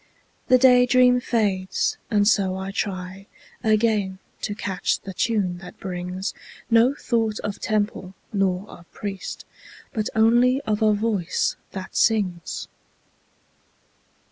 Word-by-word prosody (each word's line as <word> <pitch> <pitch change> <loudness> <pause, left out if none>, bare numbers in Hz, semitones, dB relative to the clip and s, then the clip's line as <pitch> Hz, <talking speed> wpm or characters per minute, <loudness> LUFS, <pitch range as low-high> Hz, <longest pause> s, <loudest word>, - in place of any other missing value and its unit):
The 255 - +6
day 250 -1 +6
dream 250 0 +5
fades 195 -6 0
and 205 -2 +3
so 190 -3 +2
I 190 +1 -4
try 190 0 -4 0.4
Again 215 -3 +2 0.2
to 205 - -3
catch 190 -3 -1
the 195 - -8
tune 190 -4 0
that 180 -1 -12
brings 180 0 -4 0.4
No 235 +4 +5
thought 225 -6 -1
of 205 -1 -4
temple 205 -3 -2 0.2
nor 195 -1 0
of 175 -2 -14
priest, 195 -2 -6 0.5
But 215 -1 -1
only 240 +4 +4
of 215 -5 -2
a 215 -1 +4
voice 205 -4 0 0.2
that 190 -1 -7
sings. 190 -7 0
205 Hz, 120 wpm, -23 LUFS, 190-225 Hz, 0.5 s, The